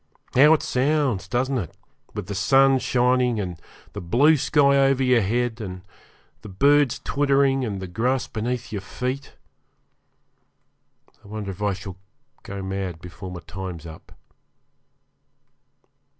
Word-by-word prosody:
How 145 +4 +7
it - - -4
sounds, 135 -5 0
doesn't 130 +1 0
it? 90 -8 -7 0.4
with 105 -3 -4
the 100 - -5
sun 135 +7 +4
shining, 125 -2 +1
and 90 -5 -5 0.3
the - - -6
blue 130 - +4
sky 140 -1 +3
over 135 -1 +3
your 125 -2 +4
head, 120 +3 -1
and 90 -3 -7 0.6
the 105 - -10
birds 140 +7 +3
twittering, 140 -1 +2
and 105 -5 -3
the 95 - -5
grass 120 +8 -1
beneath 120 +2 -4
your 105 -2 -4
feet! 130 +7 -5 1.9
I - - -15
wonder 105 -1 -5
if 95 +2 -11
I 100 -1 +1
shall 95 -1 -8 0.4
go 100 -1 -7
mad 95 -3 -4
before 90 +2 -9
my 90 -1 -8
time's 90 -3 -7
up. 80 -1 -12
120 Hz, 135 wpm, -23 LUFS, 95-135 Hz, 1.9 s, How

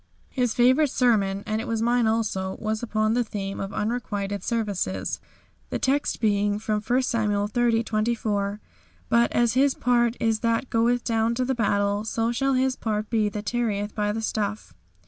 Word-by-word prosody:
His 245 -4 0
favourite 260 +5 +4
sermon, 205 -6 +1
and 215 0 -1
it 245 - -7
was 230 -1 -1
mine 240 0 +2
also, 205 -4 -1
was 215 0 -2
upon 215 -2 0
the 245 +1 +2
theme 195 -3 -5
of 195 0 -4
unrequited 205 -3 -3
services, 215 -5 -2 0.5
the - - -2
text 280 +2 0
being 205 -2 +1
from 215 0 -1
I 250 +2 +4
Samuel 210 -4 0
xxx. 230 0 +1
24, 215 -2 -1 0.5
"But 235 0 +3
as 235 -1 +2
his 270 +2 +3
part 240 -1 +2
is 225 -1 +1
that 230 +3 0
goeth 235 +1 +2
down 225 0 +1
to 255 +1 0
the 265 - 0
battle, 205 -3 +1
so 225 +1 -1
shall 270 +3 +1
his 260 0 +1
part 215 -2 -3
be 215 -3 +2
that 210 0 -6
tarrieth 210 -3 -1
by 210 -1 0
the 225 +1 -3
stuff." 215 -1 -3
225 Hz, 175 wpm, -25 LUFS, 210-240 Hz, 0.5 s, favourite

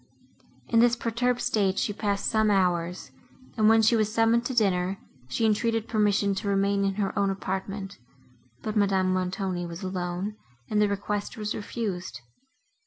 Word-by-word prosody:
In 230 - +4
this 240 +1 +5
perturbed 245 +1 -1
state 195 -3 +1
she 205 - 0
passed 200 -1 -2
some 220 -1 +2
hours, 180 -6 0 0.4
and, 215 -1 +4
when 225 0 +5
she 220 +2 +5
was 215 -1 +1
summoned 230 +1 +3
to 260 - -4
dinner, 190 -4 +1 0.3
she 225 - 0
entreated 225 +1 +1
permission 205 -2 +2
to 210 - -5
remain 200 0 +1
in 195 -1 0
her 200 -1 -2
own 200 -1 +2
apartment; 195 0 -4 0.6
but 215 0 -3
Madame 190 -3 +2
Montoni 185 -1 -2
was 170 +2 -8
alone, 185 +2 -3 0.3
and 210 0 +3
the 210 - +4
request 205 +1 -3
was 210 -1 -2
refused. 185 - -4
200 Hz, 160 wpm, -27 LUFS, 190-220 Hz, 0.6 s, this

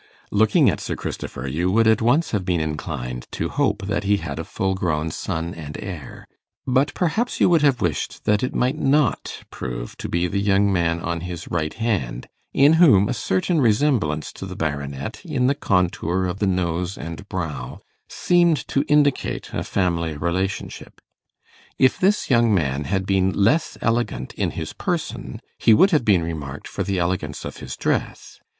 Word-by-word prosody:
Looking 110 +1 +4
at - - +2
Sir - - -3
Christopher, 65 +2 -5
you 85 +7 0
would 115 +4 +3
at 110 0 +4
once 140 +9 +2
have 105 -4 0
been 90 -2 0
inclined 60 -5 -4
to - - -2
hope 100 - 0
that 100 -2 -1
he 100 +1 +2
had 80 -6 -5
a - - -2
full 95 +3 -2
grown 80 -4 -1
son 85 0 -3
and 75 -3 -8
heir; 85 -9 -8 0.4
but 135 +2 +2
perhaps 200 +8 0
you - - +5
would 170 -3 +4
have 140 -5 +3
wished 85 -6 -2
that 105 -1 +3
it 130 - -2
might 130 +5 +1
not 140 -4 +1
prove - - -6
to - - -5
be 85 +1 +1
the 95 +3 -1
young 100 0 +3
man 85 -2 +1
on 85 0 -3
his 85 -1 -6
right 80 -3 -2
hand, 95 - -2 0.2
in 140 +3 +5
whom 105 - +6
a 125 - -1
certain 125 - 0
resemblance 110 - +1
to 95 - -7
the 95 - -7
Baronet, 70 -4 -4
in 125 - -1
the 135 - +4
contour 90 - 0
of 90 +2 -3
the 105 - +1
nose 90 0 -1
and 85 +6 -8
brow, 75 -10 -4 0.3
seemed 175 -3 +2
to 140 - +1
indicate 145 -2 +1
a - - -2
family 85 -5 -1
relationship. 90 +5 -3 0.8
If 130 - +3
this 200 +3 +2
young 120 -3 +4
man 75 -7 0
had 95 0 -1
been 95 -1 +2
less 110 - +2
elegant 115 - -1
in - - -1
his - - -4
person, - - -3 0.2
he 110 - +6
would 195 - +5
have 155 -6 +3
been 95 -6 +4
remarked 75 -4 -5
for - - -5
the 100 -1 -1
elegance 85 -4 -2
of - - -7
his - - -7
dress. - - -2
95 Hz, 180 wpm, -22 LUFS, 80-115 Hz, 0.8 s, whom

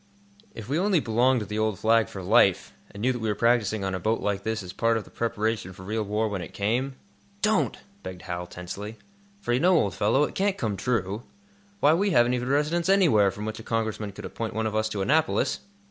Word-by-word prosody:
"If 110 -2 -8
we 145 +5 0
only 195 -2 +3
belonged 125 0 +2
to - - -4
the 105 +1 -4
old 110 -2 0
Flag 115 +3 +3
for 95 - -8
life, 100 -1 +3 0.2
and 100 - -10
knew 130 +3 +2
that 120 - -5
we 110 -1 -2
were 105 - 0
practising 110 -2 +2
on 95 0 -2
a 95 - -2
boat 110 +5 0
like 100 -1 -1
this 110 -1 -2
as 90 - -7
a - - -16
part 115 +2 +2
of 110 - -4
the - - -18
preparation 110 -4 -2
for 95 0 -12
real 110 +3 -2
war 105 +2 0
when 100 -3 -3
it - - -9
came?" 120 +7 -1 0.5
"Don't!" 215 0 +2 0.2
begged 90 -1 -8
Hal, 90 -1 -4
tensely. 100 +5 -7 0.4
"For 120 - -1
you 125 - +2
know, 180 +3 +4
old 100 - 0
fellow, 115 +8 +2
it - - -2
can't 195 0 0
come 110 -4 -1
true. 105 0 -1 0.6
Why, 150 - +6
we 200 +5 +2
haven't 120 -8 +4
even 125 0 -2
a - - 0
residence 160 +5 +1
anywhere, 155 - +5
from 105 +2 -6
which 110 0 -4
a - - -9
Congressman 110 -2 -2
could 100 - -9
appoint 115 -2 -5
one 110 0 -1
of 110 0 -2
us 110 0 +1
to 100 -2 -2
Annapolis!" 155 +8 +1
110 Hz, 240 wpm, -26 LUFS, 100-125 Hz, 0.6 s, Why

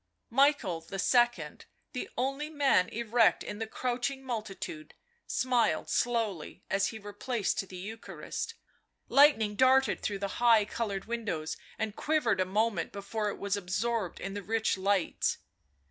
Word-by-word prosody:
Michael 245 - +3
II., 195 - -3 1.0
the 250 - -4
only 275 +4 -1
man 280 -11 +3
erect 230 0 +2
in 205 - -6
the 225 - -3
crouching 255 +3 -2
multitude, 215 -10 -5 0.3
smiled 245 -10 +1
slowly 225 -9 -1
as 195 0 +2
he 225 - -5
replaced 205 -1 -2
the 185 - -8
Eucharist; 220 - -6 0.5
lightning 275 -7 +5
darted 260 +3 +4
through 205 - -2
the 200 0 -4
high 230 -3 +6
coloured 205 -2 -3
windows 210 -10 -3 0.2
and 220 -2 -3
quivered 270 -10 +1
a - - +2
moment 205 -1 0
before 210 +1 -3
it - - -5
was 200 0 -1
absorbed 200 +1 -2
in 195 - -5
the 205 - -4
rich 220 +2 0
lights. 195 -1 +1
220 Hz, 135 wpm, -30 LUFS, 195-245 Hz, 1.0 s, high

